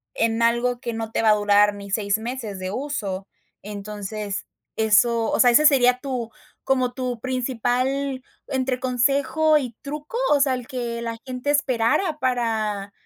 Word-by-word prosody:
en 230 0 +1
algo 240 +1 +2
que 235 -1 -4
no 225 0 -4
te - - 0
va 220 - +4
a - - +7
durar 205 0 +4
ni 200 -1 -9
6 200 0 +1
meses 225 -3 -5
de 185 0 -4
uso. 205 -8 -4 0.3
Entonces, 205 0 -5 0.3
eso 225 +1 +3
o - - 0
sea, 245 - +7
¿ese 300 +6 +5
sería 250 -4 +4
tu, 255 -4 -4 0.3
como 255 -2 +1
tu 250 -2 -3
principal, 255 +2 -1 0.2
entre 260 -1 -1
consejo 275 +5 +2
y 250 -5 -6
truco? 300 +8 -6
O 290 - +5
sea, 275 -1 +3
¿el 250 -1 -7
que 240 -2 -4
la 230 -1 -4
gente 255 +2 -2
esperara 290 +4 +1
para 220 -6 -1
245 Hz, 160 wpm, -23 LUFS, 220-260 Hz, 0.3 s, a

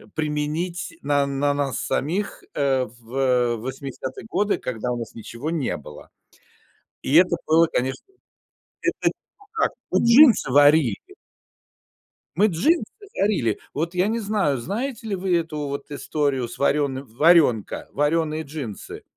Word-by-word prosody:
применить 155 - -2
на 145 -1 +2
на 140 +1 0
нас 140 -2 -1
самих, 185 +8 -2
э, 135 -3 +2
в 120 +1 0
80 130 +2 -6
годы, 205 0 +1
когда 125 0 -4
у 120 - -2
нас 115 -1 -7
ничего 115 +6 -6
не 160 -6 -1
было. 75 0 -12 0.9
И 140 - 0
это 175 0 +6
было, 165 +1 +5
конечно 130 - -2 0.8
Это - - +1 0.4
как? 435 - +1 0.2
Вот - - +2
джинсы 235 - +6
варили. 145 -4 +5 1.4
Мы 205 +4 +5
джинсы 220 - +2 0.3
варили. 185 - +1
Вот, 165 +5 -3
я 180 +3 +2
не 230 +1 -1
знаю, 200 - 0
знаете 225 - -4
ли 200 - -1
вы 180 -1 +1
эту 160 -2 -4
вот 140 +1 -5
историю 140 -3 -1
с - - -10
варёным 140 -1 0
"Варёнка". 135 - +3
Варёные 155 +2 0
джинсы. 140 -9 -7
145 Hz, 130 wpm, -23 LUFS, 130-175 Hz, 1.4 s, это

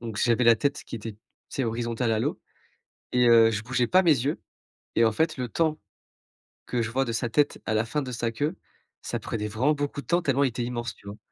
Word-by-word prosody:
donc 115 -3 -6
j'avais 120 +1 +2
la 115 0 +7
tête 140 +5 -1
qui - - -8
était, 110 0 -6
tu 105 - -23 0.3
sais, 135 - -2
horizontale 115 0 -1
à 110 - +1
l'eau - - -1 0.7
et 125 0 +4
heu, 115 -1 +7
je 110 -1 -2
bougeais 125 +1 0
pas 185 +1 +5
mes 165 -4 +5
yeux 140 +4 -1 0.6
et 115 - +5
en 110 - +3
fait, 160 +7 0
le 125 -1 -2
temps 155 +5 0 0.9
que 120 -1 -1
je 110 - -2
vois 135 +2 +1
de 115 - -3
sa 120 +1 -1
tête 145 +4 +1
à 110 - -1
la 110 +1 +2
fin 150 +6 -2
de 130 - -5
sa 115 -1 -2
queue, 145 +10 -2 0.5
ça - - -3
prenait 105 -2 -3
vraiment 125 +9 +1
beaucoup 145 0 -3
de - - -20
temps 175 +1 +2
tellement 140 -4 +2
il 135 - +3
était 120 +1 -4
immense, 120 -1 -4
tu - - -17
vois 100 +1 -7
120 Hz, 250 wpm, -26 LUFS, 115-140 Hz, 0.9 s, la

